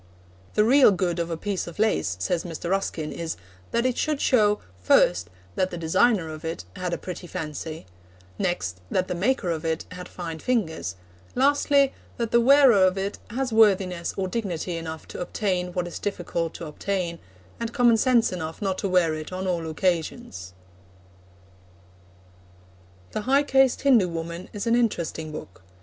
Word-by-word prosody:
The 210 - +5
real 260 +4 +7
good 180 -3 0
of 170 0 -1
a 165 - -3
piece 200 +2 -3
of 170 - -9
lace, 220 +1 +1
says 180 -4 0
Mr. 170 0 -5
Ruskin, 170 -5 -1
is 165 -1 -4 0.3
'that 235 +1 0
it 255 -1 0
should 305 -2 0
show, 210 -7 +4 0.2
first, 90 0 +4 0.2
that 185 0 0
the 175 - -6
designer 185 +3 +2
of 155 +1 -9
it 160 - -4
had 180 -1 -3
a - - -1
pretty 180 -1 -7
fancy; 160 - -5 0.5
next, 95 - -2
that 185 0 0
the - - -2
maker 190 0 0
of 160 -1 -3
it 160 0 -1
had 180 0 -8
fine 165 -3 -6
fingers; 160 - -1 0.4
lastly, 280 +1 +3 0.2
that 230 -2 -2
the 235 - +5
wearer 260 -5 +6
of 185 +1 +3
it 195 +1 -3
has 250 +1 -2
worthiness 190 -5 +3
or 190 -1 0
dignity 180 -4 -3
enough 160 -1 -6
to - - -6
obtain 180 -1 -1
what 180 -1 -1
is 175 - -6
difficult 170 -4 -3
to 170 - -6
obtain, 170 +2 -3 0.4
and 230 0 -3
common 240 -3 +4
sense 235 +1 +3
enough 160 -3 -5
not 195 -3 -1
to 195 - -1
wear 180 -3 +3
it 155 +2 -6
on 185 +1 -4
all 170 -3 -1
occasions.' 155 - -2 2.6
The - - -2
High 275 +2 +5
Caste 270 -2 +3
Hindu 245 -9 +5
Woman 170 +1 -5
is 205 +1 -4
an 230 - +2
interesting 170 -9 -1
book. 95 -11 -9
185 Hz, 170 wpm, -25 LUFS, 165-225 Hz, 2.6 s, real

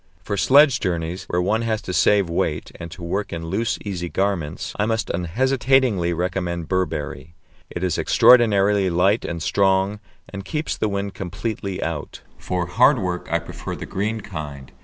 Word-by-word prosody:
For 105 - -2
sledge 140 +5 +5
journeys, 90 0 -3
where 90 0 -1
one 110 +5 +1
has 110 -2 -1
to 90 - -5
save 100 0 +3
weight, 85 - -2
and 85 - -7
to 85 - -10
work 100 +4 -2
in 80 -1 -5
loose, 110 +4 -1
easy 90 -4 -4
garments, 95 -6 -2
I 105 - +2
must 115 0 -1
unhesitatingly 125 +1 +1
recommend 85 -1 -2
Burberry. 85 -3 -3 0.3
It 85 - -5
is 90 -3 0
extraordinarily 105 -5 +5
light 95 +6 +2
and 85 -2 -4
strong, 95 +2 +2 0.3
and 100 -1 -7
keeps 150 +11 -3
the 110 - -1
wind 100 0 -3
completely 95 +1 -4
out. 80 -2 -5 0.2
For 90 -1 -2
hard 120 +10 +4
work 90 -4 -3
I 85 - +3
prefer 85 0 -7
the - - -7
green 105 +3 -2
kind. 75 -8 -8
95 Hz, 165 wpm, -22 LUFS, 85-105 Hz, 0.3 s, sledge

